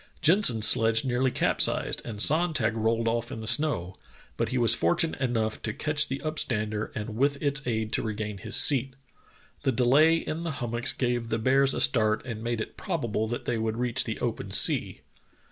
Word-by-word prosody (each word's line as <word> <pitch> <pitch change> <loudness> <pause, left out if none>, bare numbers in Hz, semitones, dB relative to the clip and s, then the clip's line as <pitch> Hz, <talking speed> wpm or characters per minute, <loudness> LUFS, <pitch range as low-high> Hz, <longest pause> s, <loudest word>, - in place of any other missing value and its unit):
Jensen's 150 - +4
sledge 115 +2 +2
nearly 130 +1 0
cap - - -1
sized, - - +2
and 110 -4 -8
Sonntag 155 -4 +2
rolled 115 +1 -1
off 115 +1 -2
in - - -7
the 110 - -8
snow, 115 - +2 0.4
but - - -2
he 130 - -2
was 120 -3 +3
fortunate 115 - 0
enough 115 -4 -2
to 110 - -5
catch 150 0 0
the 135 - -4
upstander 110 -8 -3
and 105 0 -6
with 140 +3 0
its 140 -2 0
aid 110 -2 -3
to - - 0
regain 105 -2 -5
his 110 +3 -4
seat. 135 -2 +3 0.7
The 135 - 0
delay 135 +7 +3
in 165 0 -5
the 165 -3 -4
hummocks 120 +2 -2
gave 120 -2 -2
the 115 - -2
bears 135 +4 +2
a - - -1
start 110 -2 +2
and 115 -4 -7
made 120 -1 -3
it - - -8
probable 115 -7 -3
that 120 +2 -6
they 120 -2 -2
would 110 0 -3
reach 125 +1 0
the 110 -3 -5
open - - -4
sea. - - +4
120 Hz, 195 wpm, -26 LUFS, 110-135 Hz, 0.7 s, Jensen's